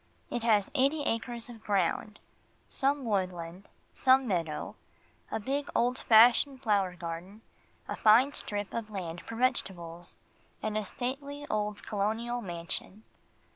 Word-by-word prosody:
It 240 - -1
has 215 -4 +3
eighty 290 +2 +2
acres 235 0 -2
of 235 -3 -11
ground, 205 +1 0 0.5
some 275 0 +1
woodland, 185 -3 -2 0.3
some 260 0 +4
meadow, 165 -6 -2 0.5
a - - -2
big 275 +6 -2
old 245 +2 +2
fashioned 245 +4 +5
flower 200 -5 +2
garden, 175 +5 -7 0.5
a - - -3
fine 245 +6 +5
strip 205 -6 -3
of 230 -2 -3
land 175 -5 -5
for 230 - -8
vegetables, 175 -8 -2 0.5
and 215 -1 -1
a 215 -1 -1
stately 280 +6 -4
old 210 -1 -1
colonial 225 +4 -1
mansion. 175 +2 -5
215 Hz, 130 wpm, -30 LUFS, 190-245 Hz, 0.5 s, fashioned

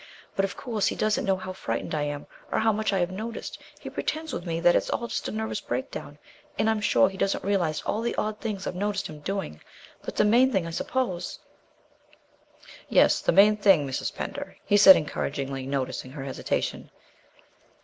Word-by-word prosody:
But, 195 - +2
of 195 - -7
course, 225 -5 -1
he - - -1
doesn't 215 0 +1
know 195 -1 +3
how 185 0 -6
frightened 115 -9 -4
I 150 - 0
am, 145 0 -3 0.3
or - - +1
how 220 0 +3
much 215 +1 0
I 195 - +1
have 175 0 0
noticed. 220 +4 -6 0.2
He - - -10
pretends 315 -1 -3
with 175 - -5
me 165 0 -1
that 175 +1 +5
it's - - +1
just 235 - -2
a - - -3
nervous 220 +1 -3
breakdown, - - -5 0.4
and 215 - +2
I'm 220 -1 +1
sure 190 - +4
he 190 0 -7
doesn't 195 - 0
realize 185 -6 0
all 215 - -1
the 235 0 -1
odd 210 0 -2
things 205 -4 -3
I've - - -3
noticed 200 +2 -2
him 155 -1 -8
doing. 190 - -4 0.4
But - - -7
the - - +3
main 245 +5 +5
thing, 190 -7 +1
I 165 - -5
suppose 185 -1 -2 0.8
" - - -22
"Yes, - - +5
the - - +2
main 205 +4 +6
thing, 195 -8 +4
Mrs. 130 - -3
Pender," - - -6
he 205 - +3
said 195 -2 +10
encouragingly, 135 -3 -3
noticing 135 -2 -3
her 140 -2 -6
hesitation. 135 -1 -3
195 Hz, 200 wpm, -26 LUFS, 160-215 Hz, 0.8 s, said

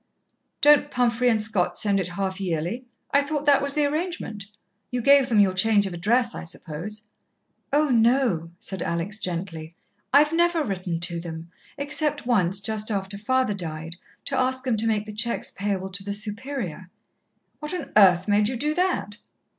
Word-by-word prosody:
"Don't 295 0 +6
Pumphrey 245 -1 +2
and 225 -2 +2
Scott 200 -5 -1
send 200 -2 +1
it 185 - -1
half 190 +2 -3
yearly? 180 +7 -3 0.3
I 285 - +4
thought 295 0 -3
that 285 -2 +5
was 280 0 +1
the 300 -1 +3
arrangement. 295 - -3 0.4
You 250 - -2
gave 275 +2 +5
them 220 -3 +3
your 195 -2 +4
change 205 +2 +3
of 190 - -4
address, 230 +8 +1
I - - -6
suppose." 170 +6 -7 0.7
"Oh, 295 +1 +2
no," 230 -8 +2
said 190 -1 -6
Alex 170 +5 -2
gently. 170 -3 -5 0.4
"I've 295 +3 +5
never 340 -1 +2
written 185 - -3
to 175 -1 -1
them, 165 0 -8 0.3
except 295 0 +1
once, 195 -6 +2
just 215 +1 -1
after 200 -1 -3
father 255 +2 0
died, 165 -3 -6 0.3
to 280 - 0
ask 260 0 0
them 255 -4 0
to 225 +2 0
make 215 -2 0
the 215 - -8
cheques 235 +3 -1
payable 195 -2 -3
to 195 - +3
to 195 - -9
the 200 0 -2
Superior." 210 - -4 0.7
"What 300 0 -4
on 315 -6 -6
earth 185 -3 +6
made 210 0 +3
you 255 - -3
do 295 +5 -1
that?" 355 - -1
215 Hz, 180 wpm, -24 LUFS, 185-265 Hz, 0.7 s, Don't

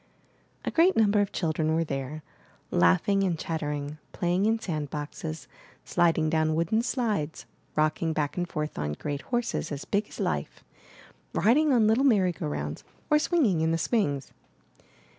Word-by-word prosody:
A - - -1
great 345 +3 +4
number 210 -2 +4
of 200 - -1
children 160 -1 0
were 165 - +2
there, 140 +1 -4 0.5
laughing 90 - +3
and 180 -4 0
chattering, 150 -2 -3
playing 180 +4 +1
in 225 +1 +3
sand 155 -9 -3
boxes, 155 +2 -6 0.4
sliding 165 -2 +2
down 155 0 +1
wooden 170 +8 +1
slides, 215 - -2 0.3
rocking 155 +2 +1
back 150 -2 -1
and 175 -1 -2
forth 150 - -4
on 75 0 -2
great 145 - -4
horses 240 -9 -2
as 145 -1 -5
big 205 +1 0
as - - -11
life, - - -2 0.7
riding 290 +8 +4
on 235 -4 +4
little 220 +5 +3
merry 205 -9 +4
go 165 - -5
rounds, 75 +1 -4 0.3
or 300 - +6
swinging 275 - +2
in 160 - +2
the 165 - +1
swings. 150 - 0
165 Hz, 160 wpm, -27 LUFS, 150-210 Hz, 0.7 s, or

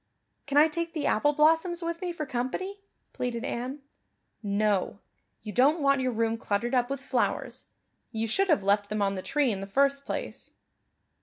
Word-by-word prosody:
"Can 285 0 0
I 300 +2 +8
take 335 +1 -3
the 305 -4 -2
apple 290 +7 +3
blossoms 325 +4 +3
with 335 0 -3
me 360 -1 -2
for 315 -3 -4
company?" 270 +11 -3 0.3
pleaded 245 0 -3
Anne. 260 +4 -4 0.6
"No; 205 -2 0 0.5
you 210 -1 -6
don't 280 - +4
want 275 -1 +3
your 255 -1 0
room 225 0 0
cluttered 230 +5 -1
up 245 -1 +2
with 275 -1 -3
flowers. 260 -2 -2 0.5
You 225 -1 -2
should 385 - +1
have 305 - +3
left 205 +1 +2
them 215 -1 0
on 195 0 +1
the 190 - -4
tree 290 +1 +1
in 195 -2 -3
the 195 - -6
first 275 +6 +2
place." - - -6
260 Hz, 180 wpm, -28 LUFS, 220-305 Hz, 0.6 s, I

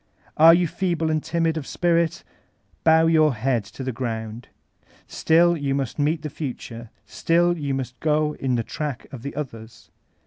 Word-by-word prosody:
Are 165 +2 +8
you 175 0 +2
feeble 165 -2 -1
and 155 -1 -1
timid 165 -1 0
of 145 - -5
spirit? 170 -2 0 0.6
Bow 160 0 +5
your 155 -4 +3
head 120 0 0
to 105 +6 -9
the 130 - -2
ground. 115 -2 -5 0.6
Still 170 +2 +3
you 140 -3 -2
must 135 0 -3
meet 150 +2 0
the 150 - -4
future; 120 -5 -7 0.2
still 170 +11 +1
yoa 145 -5 -3
must 125 -1 -5
go 150 -1 +1
in 130 -2 0
the 115 - -1
track 145 +1 -5
of 130 - -8
the 140 - -7
others. 115 -6 -8
150 Hz, 170 wpm, -23 LUFS, 125-160 Hz, 0.6 s, Are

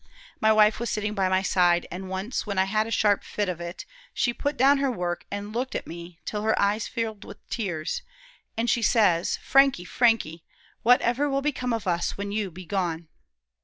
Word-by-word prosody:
My 220 - +4
wife 215 0 +4
was 235 -1 -2
sitting 210 0 -2
by 190 -3 +1
my 190 0 +2
side, 175 -2 +3
an' 185 +2 -6
once, 190 +6 -3
when 200 -2 -3
I 190 - +5
had 215 +3 0
a - - -6
sharp 210 -3 +2
fit 205 -1 -2
of 175 -2 -4
it, 170 +1 -7 0.3
she 240 - +1
put 285 +4 -3
down 275 +2 +5
her 275 -1 +1
work, 175 -7 -3
an' 205 +1 -5
looked 250 +4 -3
at - - -3
me 170 0 -9
till 210 - -3
her 220 +1 +1
eyes 205 +2 +1
filled 220 -3 -4
with - - -11
tears, 175 -9 -3 0.6
an' 225 - +1
she 240 0 +1
says, 200 -7 +3
'Frankie, 270 -9 +4
Frankie, 225 -9 +1 0.4
whatever 250 +3 +3
will 275 0 0
become 260 -4 -1
of 225 -2 -2
us 175 -2 -1
when 200 0 -4
you 210 -2 -1
be 180 +2 -11
gone?' 170 -3 -2
210 Hz, 200 wpm, -26 LUFS, 180-235 Hz, 0.6 s, I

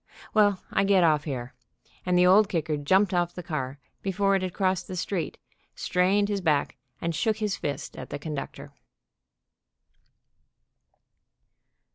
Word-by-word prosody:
Well, 205 -3 +3
I 195 - +2
get 195 -2 +4
off 150 -3 +3
here," 130 -4 -5 0.5
and 180 0 +3
the 180 - +5
Old 195 +3 +6
Kicker 160 -3 -1
jumped 190 +8 +2
off 175 -1 0
the 180 - -6
car 140 -5 -4 0.2
before 195 0 +1
it 190 - +1
had 185 -1 -2
crossed 185 -1 0
the 185 - -5
street, 180 -1 -3 0.4
strained 190 +3 +2
his 205 -1 -2
back, 150 -7 +1 0.2
and 170 0 -2
shook 220 +5 0
his 210 -2 -1
fist 145 0 -5
at - - -8
the - - -4
conductor. 145 -1 -6
180 Hz, 145 wpm, -27 LUFS, 155-195 Hz, 0.5 s, Old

